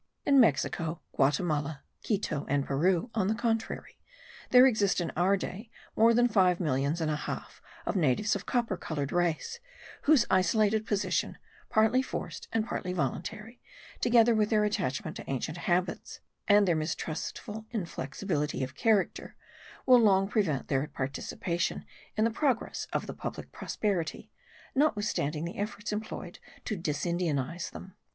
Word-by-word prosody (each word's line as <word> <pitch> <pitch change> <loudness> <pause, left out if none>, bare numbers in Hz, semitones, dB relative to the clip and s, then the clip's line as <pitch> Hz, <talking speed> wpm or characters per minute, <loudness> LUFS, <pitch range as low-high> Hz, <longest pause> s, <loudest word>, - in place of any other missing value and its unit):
In 275 -1 +5
Mexico, 165 - +2 0.2
Guatimala, 145 0 +1 0.2
Quito, 195 -9 -1
and 140 -1 +1
Peru, 175 - +1
on 205 -4 +1
the 215 - +1
contrary, 225 -1 -2 0.5
there 250 +1 +8
exist 210 -8 +3
in 175 - -2
our 185 +4 +2
day 205 +4 -6 0.3
more 225 +1 +6
than 240 +1 +5
five 185 -6 +3
millions 145 +1 0
and 155 -1 0
a - - 0
half 150 - -6 0.2
of - - -1
natives 180 - +2
of - - -6
copper 235 -6 0
coloured 145 -5 -3
race, 175 - 0 0.5
whose 290 -6 +5
isolated 215 +4 +3
position, 205 -2 0 0.3
partly 220 +4 +4
forced 265 - -6
and 225 -1 0
partly 180 -5 -3
voluntary, 185 - -4 0.4
together 235 -1 +5
with 215 -1 +2
their 215 -2 +3
attachment 195 -10 -2
to - - -9
ancient 155 +5 -3
habits, 180 +1 -1 0.3
and 205 -1 +6
their 170 - +3
mistrustful 165 +7 -4
inflexibility 170 - -3
of 130 0 -4
character, 215 - +1 0.5
will 255 -2 +7
long 195 -3 +4
prevent 190 - 0
their 135 +1 0
participation 170 +6 -3 0.3
in 215 - +3
the 230 - +2
progress 255 0 -1
of - - -1
the - - -6
public - - -6
prosperity, 185 -7 -3 0.4
notwithstanding 205 - 0
the 175 - -6
efforts 210 0 -3
employed 215 +1 -6 0.3
to 215 - -2
disindianize 165 -1 -2
them. 190 -1 -10
190 Hz, 145 wpm, -29 LUFS, 155-220 Hz, 0.5 s, there